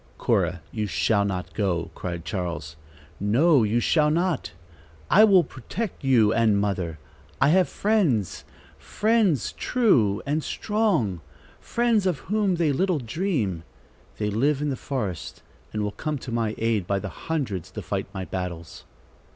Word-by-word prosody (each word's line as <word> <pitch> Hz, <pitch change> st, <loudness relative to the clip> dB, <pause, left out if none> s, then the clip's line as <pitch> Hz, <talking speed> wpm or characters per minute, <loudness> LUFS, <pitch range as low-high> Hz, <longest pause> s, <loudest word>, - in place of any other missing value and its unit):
"Cora, 90 Hz, -2 st, 0 dB
you 105 Hz, -1 st, -2 dB
shall 100 Hz, +1 st, +2 dB
not 95 Hz, -3 st, -3 dB
go!" 90 Hz, -5 st, -1 dB
cried 85 Hz, -2 st, -5 dB
Charles. 85 Hz, -5 st, -4 dB, 0.4 s
"No, 130 Hz, -, +4 dB
you 110 Hz, +2 st, +2 dB
shall 150 Hz, +4 st, +3 dB
not. 170 Hz, -, 0 dB, 0.6 s
I 210 Hz, -, +8 dB
will 195 Hz, -5 st, +6 dB
protect 165 Hz, -, -6 dB
you 115 Hz, -5 st, +4 dB
and 110 Hz, -3 st, +3 dB
mother. 95 Hz, -6 st, -2 dB, 0.4 s
I -, -, +4 dB
have 185 Hz, +2 st, +4 dB
friends, 175 Hz, -, +1 dB, 0.4 s
friends 210 Hz, -, +1 dB
true 120 Hz, -, +2 dB
and 150 Hz, +2 st, -1 dB
strong, 185 Hz, -, 0 dB, 0.4 s
friends 230 Hz, -4 st, +1 dB
of 175 Hz, -5 st, +1 dB, 0.2 s
whom 205 Hz, -4 st, +2 dB
they 165 Hz, -3 st, +1 dB
little 180 Hz, +5 st, +1 dB
dream. 120 Hz, -, -2 dB, 0.6 s
They 105 Hz, -1 st, -1 dB
live 135 Hz, +7 st, +1 dB
in 150 Hz, -1 st, -1 dB
the -, -, -1 dB
forest 110 Hz, -, -5 dB, 0.3 s
and 105 Hz, -1 st, -2 dB
will 105 Hz, -, -1 dB
come 150 Hz, +9 st, -3 dB
to 125 Hz, -1 st, -8 dB
my 115 Hz, -2 st, -1 dB
aid 110 Hz, -5 st, 0 dB
by 100 Hz, -, +1 dB
the 95 Hz, +8 st, -7 dB
hundreds 130 Hz, -, -2 dB
to -, -, -7 dB
fight -, -, -3 dB
my 95 Hz, -1 st, -5 dB
battles." 90 Hz, -3 st, -6 dB
115 Hz, 150 wpm, -25 LUFS, -, 0.6 s, I